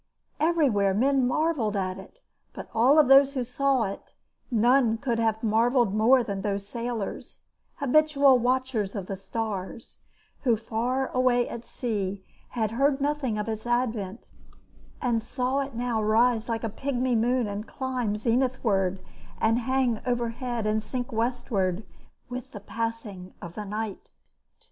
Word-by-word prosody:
Everywhere 265 - +2
men 265 +3 +3
marvelled 250 -6 0
at 185 -1 -2
it, 195 - -13 0.4
but - - -7
of - - -23
all 270 +7 +6
those 270 +1 +6
who 255 - 0
saw 260 +1 +1
it 200 -1 -6 0.3
none 240 0 +3
could 235 -1 -1
have 225 -1 0
marvelled 230 0 +2
more 240 +4 +5
than 200 -3 -4
those 200 0 -2
sailors, 235 -2 -5 0.4
habitual 280 -1 +4
watchers 250 -4 0
of 195 -3 -4
the 195 - -4
stars, 210 +2 -5 0.4
who 240 -5 +2
far 240 +4 -1
away 250 -1 +2
at 235 - -7
sea 200 -5 -3 0.2
had 220 -3 -1
heard 275 +4 +2
nothing 280 -5 -1
of 210 +1 -3
its 220 +1 -4
advent 230 -4 -1 0.8
and 235 -3 +1
saw 255 +3 -1
it 275 -3 -4
now 235 -2 -1
rise 225 +2 +2
like 230 0 -2
a - - 0
pigmy 255 +2 -1
moon 240 +2 +2
and 205 +2 -5
climb 255 -5 -2
zenithward 220 -5 0 0.4
and 225 +2 +2
hang 255 -2 0
overhead 240 -1 -2
and 215 +1 +1
sink 245 +3 -4
westward 225 -5 -1 0.4
with 250 -1 -7
the 205 - -6
passing 210 -4 -5
of 170 - -8
the 210 +1 -6
night. 210 0 -5
235 Hz, 145 wpm, -26 LUFS, 215-255 Hz, 0.8 s, all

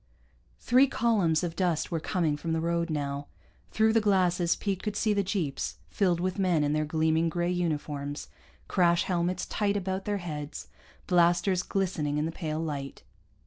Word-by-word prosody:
Three 255 +3 +4
columns 200 - +2
of 170 -1 -3
dust 175 -4 0
were 165 - 0
coming 160 -2 0
from 160 +2 -3
the 160 - +1
road 170 +1 0
now. 145 -2 -3 0.4
Through 220 0 +3
the 225 - +4
glasses 180 -4 +2
Pete 195 -3 -2
could 210 -1 -3
see 215 0 +2
the 200 - +2
jeeps, 185 -8 -2 0.2
filled 180 -4 +1
with 185 +2 -2
men 180 -5 +2
in 145 0 +1
their 155 0 +1
gleaming 160 +1 +1
gray 175 +2 -1
uniforms, 150 -4 -3 0.4
crash 175 -2 +3
helmets 180 0 -1
tight 205 -1 0
about 190 0 -3
their 205 -1 0
heads, 150 -5 -6 0.4
blasters 175 +1 +3
glistening 170 -7 -1
in 150 - 0
the 165 - -2
pale 155 -2 -4
light. 145 -4 -5
175 Hz, 170 wpm, -28 LUFS, 155-190 Hz, 0.4 s, Three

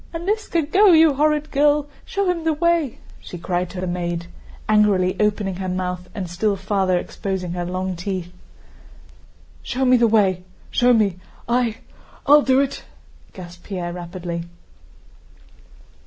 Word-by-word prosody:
Aníska, 345 -1 -1
go, 400 -1 +6
you 320 -2 +6
horrid 300 +2 +1
girl, 290 +1 +3 0.2
show 400 -1 -1
him 350 -2 0
the 320 -1 +1
way!" 330 -4 +1 0.2
she 180 - -9
cried 175 +1 -2
to 190 - -7
the 185 - -2
maid, 175 -1 -3 0.4
angrily 205 -4 +3
opening 205 -3 0
her 185 -1 -3
mouth 180 0 -3
and 195 -4 -4
still 200 +4 0
farther 190 -2 0
exposing 185 0 -4
her 175 0 -3
long 185 +1 -3
teeth. 180 0 -5 1.3
"Show 260 +1 -2
me 255 0 +5
the 235 -1 +4
way, 195 -5 +2 0.3
show 245 0 +3
me, 210 -6 +2 0.3
I... 235 -2 +1 0.5
I'll 295 +1 +7
do 265 -1 +3
it," 280 - -3 0.5
gasped 175 -1 -11
Pierre 180 -3 -4
rapidly. 175 -1 -6
200 Hz, 140 wpm, -21 LUFS, 180-280 Hz, 1.3 s, I'll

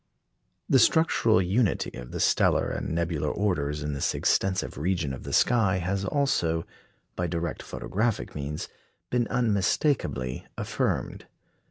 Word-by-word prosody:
The 135 - +5
structural 115 - +4
unity 100 +4 +1
of - - -8
the - - -5
stellar - - +3
and - - -3
nebular 80 -2 -1
orders 75 -8 -1
in 75 0 -2
this 70 - -1
extensive 95 -1 +1
region 80 -2 -1
of 65 - -7
the - - -7
sky 110 -7 +3
has 95 +2 -2
also, 85 - +1 0.5
by 90 - -1
direct 85 0 -3
photographic 105 - -2
means, 75 +1 -4 0.4
been 120 -1 +1
unmistakably 105 - 0
affirmed. - - -2
90 Hz, 130 wpm, -27 LUFS, 75-110 Hz, 0.5 s, The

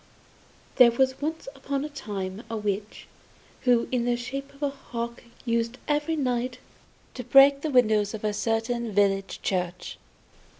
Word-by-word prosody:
There 250 -2 +9
was 260 +3 +1
once 320 +1 -3
upon 275 +1 -3
a - - -5
time 205 -7 -5
a 225 - -3
witch, 210 0 -3 0.6
who 245 -2 +4
in 245 -2 0
the 245 0 +2
shape 275 +3 -6
of 285 - -9
a 285 - +1
hawk 235 -3 -6 0.2
used 230 +1 0
every 295 +2 0
night 250 -3 -1 0.6
to 250 - -6
break 275 +3 +6
the 310 - -2
windows 220 -5 +3
of 215 - -9
a 210 -1 0
certain 225 +1 -1
village 195 -1 +1
church. 180 -1 -3
240 Hz, 155 wpm, -26 LUFS, 215-275 Hz, 0.6 s, There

